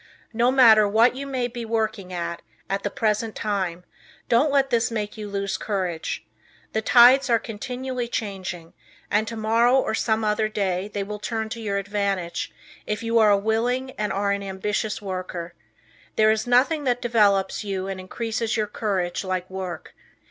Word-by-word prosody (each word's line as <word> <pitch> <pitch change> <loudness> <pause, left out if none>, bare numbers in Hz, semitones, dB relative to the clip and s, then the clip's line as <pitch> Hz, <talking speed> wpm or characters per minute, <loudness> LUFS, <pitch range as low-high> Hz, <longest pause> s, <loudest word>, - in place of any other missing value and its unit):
No 235 +2 +3
matter 225 -5 +7
what 225 +5 +4
you 280 +1 -5
may 255 -3 -1
be 240 -1 -6
working 220 -4 -2
at, 170 -1 -4 0.3
at 195 0 0
the - - -2
present 220 -3 -1
time, 185 -4 -2 0.5
don't 250 +6 +4
let 275 -1 +2
this 235 0 +2
make 210 -3 -3
you 210 -2 -6
lose 200 -1 -2
courage. 185 -6 -3 0.5
The 220 - +1
tides 250 +4 +6
are 230 - +5
continually 250 +3 -4
changing, 190 -7 -5 0.4
and 215 +2 +2
tomorrow 230 +2 +2
or 265 - +1
some 220 0 0
other 215 0 +1
day 195 -2 -1
they 205 -1 -2
will 210 +1 -6
turn 220 0 -3
to 230 +1 -6
your 200 -2 -1
advantage 200 -3 -2 0.4
if 210 +1 -2
you 230 0 +2
are 215 -1 +6
a 200 - +5
willing 240 +5 0
and 210 -6 -3
are 200 +1 0
an 200 0 -1
ambitious 210 +2 -3
worker. 185 -3 -5 0.6
There 215 0 +5
is 220 +2 -1
nothing 275 +6 +3
that 245 -1 0
develops 205 -5 +2
you 195 -2 -3
and 195 -1 -4
increases 225 +4 -3
your 215 - +1
courage 195 -5 -2
like 185 -1 -2
work. 185 -2 -6
215 Hz, 170 wpm, -24 LUFS, 195-235 Hz, 0.6 s, matter